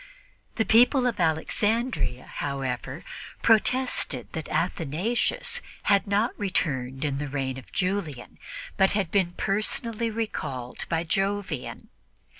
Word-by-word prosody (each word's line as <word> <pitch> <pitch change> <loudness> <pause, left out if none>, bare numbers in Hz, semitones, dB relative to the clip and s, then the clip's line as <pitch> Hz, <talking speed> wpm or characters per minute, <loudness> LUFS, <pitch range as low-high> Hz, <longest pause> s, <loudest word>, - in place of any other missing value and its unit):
The 225 - +1
people 245 +3 +5
of 235 -5 0
Alexandria, 180 - 0
however, 135 0 -4 0.4
protested 230 - +3
that 160 -2 -5
Athanasius 210 - 0 0.2
had 200 +1 +3
not 205 +4 +2
returned 135 -9 0
in 140 -1 -1
the 145 - -3
reign 135 -2 -2
of 130 - -16
Julian 180 -9 -2 0.4
but 190 0 +4
had 195 -5 0
been 185 -4 +2
personally 215 +4 -1
recalled 190 - -4
by 165 0 +1
Jovian. 195 -4 -2
185 Hz, 110 wpm, -26 LUFS, 145-220 Hz, 0.4 s, people